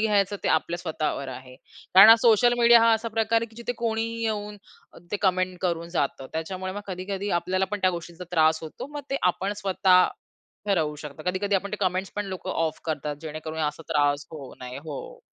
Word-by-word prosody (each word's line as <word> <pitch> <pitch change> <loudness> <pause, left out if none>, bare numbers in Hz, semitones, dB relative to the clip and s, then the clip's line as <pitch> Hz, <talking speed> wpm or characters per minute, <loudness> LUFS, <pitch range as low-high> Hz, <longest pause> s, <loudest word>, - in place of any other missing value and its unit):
घ्यायचं 205 -2 +2
ते - - +2
आपल्या 175 - +1
स्वतःवर 155 -5 -3
आहे. 130 0 -9 0.4
कारण 195 +3 +10
हा 225 - +10
सोशल 240 +1 +5
मीडिया 235 0 +7
हा 230 0 +5
असा 225 +1 0
प्रकार 225 +1 +1
आहे 230 - -3
की - - -20
जिथे 235 +1 -3
कोणीही 230 0 -1
येऊन 210 -1 -3 0.4
अ, - - -14
ते - - +2
कमेंट 185 -1 +1
करून 170 -2 -1
जातं. 140 -5 -2
त्याच्यामुळे 185 +4 -4
मग 205 - -5
कधी-कधी 195 +2 -4
आपल्याला 185 +2 0
पण 210 - -2
त्या 185 - +3
गोष्टींचा 170 0 -7
त्रास 160 -2 +3
होतो. 160 - -7
मग 295 - -4
ते 275 - +1 0.2
आपण 195 +3 -3
स्वतः 190 -2 +4 0.6
ठरवू 160 -7 +1
शकतो. 150 +1 -9
कधी-कधी 200 +2 -1
आपण 200 +1 0
ते - - -1
कमेंट्स 185 0 0
पण 205 - -1
लोकं 185 -1 -5
ऑफ 160 -3 -1
करतात 150 -2 -3
जेणेकरून 155 0 -6
असा 165 - -8
त्रास 145 0 +1
होऊ 145 -5 -9
नये. 125 0 -7
हो, 480 - -8
185 Hz, 200 wpm, -25 LUFS, 160-210 Hz, 0.6 s, कारण